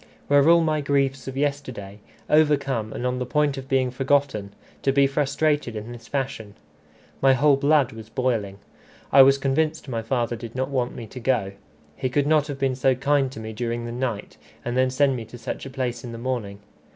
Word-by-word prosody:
Were 145 Hz, +2 st, +5 dB
all 170 Hz, 0 st, +6 dB
my 155 Hz, -2 st, +1 dB
griefs 140 Hz, -2 st, 0 dB
of 135 Hz, 0 st, -5 dB
yesterday, 130 Hz, -9 st, -3 dB, 0.3 s
overcome 140 Hz, -7 st, +2 dB
and 120 Hz, -, -4 dB
on 125 Hz, 0 st, -1 dB
the 125 Hz, -, -2 dB
point 150 Hz, +1 st, +1 dB
of 135 Hz, -1 st, -8 dB
being 130 Hz, -2 st, +2 dB
forgotten, 135 Hz, -6 st, 0 dB, 0.3 s
to 135 Hz, -, +2 dB
be 140 Hz, 0 st, +4 dB
frustrated 145 Hz, -2 st, 0 dB
in 110 Hz, +2 st, -6 dB
this 120 Hz, -1 st, -11 dB
fashion? 130 Hz, -7 st, -4 dB, 0.7 s
My 135 Hz, 0 st, +6 dB
whole 140 Hz, +2 st, +4 dB
blood 140 Hz, -1 st, +3 dB
was 110 Hz, -1 st, -11 dB
boiling. 115 Hz, -6 st, -1 dB, 0.5 s
I 135 Hz, -, +8 dB
was 135 Hz, +1 st, +6 dB
convinced 150 Hz, +3 st, 0 dB
my 115 Hz, -3 st, -2 dB
father 120 Hz, +1 st, -1 dB
did 115 Hz, 0 st, -9 dB
not 130 Hz, +1 st, -1 dB
want 125 Hz, -3 st, -1 dB
me 115 Hz, -, -7 dB
to 125 Hz, +4 st, -9 dB
go. 115 Hz, -6 st, 0 dB, 0.4 s
He 130 Hz, -, -2 dB
could 140 Hz, +2 st, +1 dB
not 150 Hz, -1 st, +3 dB
have 145 Hz, -2 st, -5 dB
been 135 Hz, -1 st, 0 dB
so 130 Hz, 0 st, +2 dB
kind 135 Hz, 0 st, +1 dB
to 120 Hz, -, -9 dB
me 110 Hz, 0 st, -6 dB
during 120 Hz, +1 st, -3 dB
the 120 Hz, -, -5 dB
night, 120 Hz, -4 st, -4 dB, 0.3 s
and 120 Hz, 0 st, -2 dB
then 130 Hz, 0 st, +3 dB
send 135 Hz, +1 st, +2 dB
me 120 Hz, -, -4 dB
to 115 Hz, +3 st, -11 dB
such 120 Hz, +3 st, -6 dB
a -, -, -7 dB
place 125 Hz, -3 st, -3 dB
in 120 Hz, -2 st, -7 dB
the -, -, -6 dB
morning. 115 Hz, -5 st, -4 dB
130 Hz, 210 wpm, -24 LUFS, 120-140 Hz, 0.7 s, I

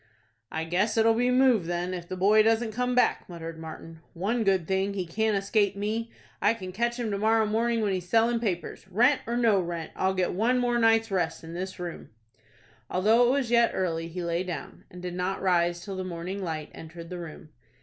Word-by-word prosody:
"I 160 Hz, -, -2 dB
guess 185 Hz, +7 st, 0 dB
it'll 225 Hz, 0 st, +5 dB
be 245 Hz, +2 st, +1 dB
move 250 Hz, -8 st, +4 dB
then, 175 Hz, +1 st, -2 dB
if 175 Hz, -2 st, -6 dB
the 185 Hz, -, -5 dB
boy 205 Hz, +4 st, +5 dB
doesn't 225 Hz, +1 st, +2 dB
come 250 Hz, +2 st, -1 dB
back," 250 Hz, -, +2 dB
muttered 165 Hz, -2 st, -7 dB
Martin. 160 Hz, 0 st, -9 dB, 0.2 s
"One 220 Hz, +7 st, 0 dB
good 190 Hz, -5 st, +1 dB
thing, 190 Hz, +1 st, 0 dB
he 185 Hz, -2 st, -2 dB
can't 215 Hz, +4 st, 0 dB
escape 200 Hz, 0 st, +1 dB
me. 220 Hz, +3 st, -2 dB, 0.3 s
I 220 Hz, -, +3 dB
can 185 Hz, -4 st, -7 dB
catch 235 Hz, +5 st, -1 dB
him 230 Hz, -3 st, -2 dB
to 200 Hz, -, -2 dB
morrow 220 Hz, +1 st, +3 dB
morning 230 Hz, +2 st, +1 dB
when 205 Hz, -2 st, +1 dB
he's 180 Hz, -1 st, -4 dB
selling 230 Hz, +2 st, +3 dB
papers. 190 Hz, -5 st, -3 dB
Rent 245 Hz, +9 st, +3 dB
or 235 Hz, +1 st, -1 dB
no 225 Hz, -5 st, +4 dB
rent, 170 Hz, -2 st, -5 dB
I'll 190 Hz, 0 st, 0 dB
get 185 Hz, -1 st, 0 dB
one 230 Hz, +7 st, +2 dB
more 240 Hz, -1 st, +1 dB
night's 225 Hz, -1 st, +3 dB
rest 185 Hz, -2 st, -1 dB
in 165 Hz, +1 st, -8 dB
this 185 Hz, +2 st, -5 dB
room." 175 Hz, -1 st, -6 dB, 0.8 s
Although 220 Hz, +6 st, +4 dB
it -, -, +3 dB
was 265 Hz, -3 st, 0 dB
yet 235 Hz, -1 st, +4 dB
early 165 Hz, -3 st, -1 dB
he 175 Hz, +2 st, -5 dB
lay 170 Hz, 0 st, -1 dB
down, 180 Hz, -2 st, -7 dB
and 180 Hz, 0 st, -11 dB
did 180 Hz, -1 st, -4 dB
not 180 Hz, +2 st, -2 dB
rise 175 Hz, -2 st, +1 dB
till 195 Hz, -2 st, -5 dB
the 185 Hz, -, -3 dB
morning 185 Hz, +2 st, -5 dB
light 155 Hz, -3 st, -4 dB
entered 165 Hz, +1 st, -10 dB
the 180 Hz, -, -5 dB
room. 160 Hz, -1 st, -9 dB
195 Hz, 215 wpm, -27 LUFS, 175-225 Hz, 0.8 s, it'll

